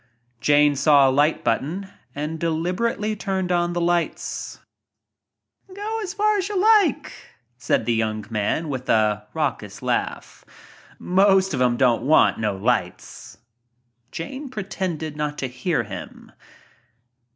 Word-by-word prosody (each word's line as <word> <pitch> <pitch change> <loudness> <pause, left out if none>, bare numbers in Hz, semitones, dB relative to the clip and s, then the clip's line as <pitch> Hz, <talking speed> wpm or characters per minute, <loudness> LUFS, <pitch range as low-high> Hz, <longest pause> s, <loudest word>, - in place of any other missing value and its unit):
Jane 145 +2 +4
saw 140 0 +5
a - - +3
light 145 +3 +2
button 160 +12 -1 0.3
and 150 +3 -4
deliberately 180 +7 -1
turned 190 -3 -2
on 175 0 +1
the 175 - -1
lights. 175 0 -2 1.2
"Go 430 +3 -3
as 400 -2 -5
far 425 0 +2
as 385 - -2
you 405 -3 -1
like," 415 - +3 0.5
said - - 0
the 120 - +1
young 110 -2 -1
man 110 +9 -1
with 130 -2 -5
raucous 105 -1 -1
laugh. - - -3 0.5
"Most 190 0 +3
o' 130 - -1
them 125 -1 +2
don't 120 -3 +3
want 150 +6 +4
no 105 0 -2
s." 90 -8 -2 0.7
Jane 265 - -6
pretended 185 - -4
not 150 0 -3
to 130 - -2
hear 125 +2 -1
him. 105 -3 -9
160 Hz, 130 wpm, -23 LUFS, 125-195 Hz, 1.2 s, saw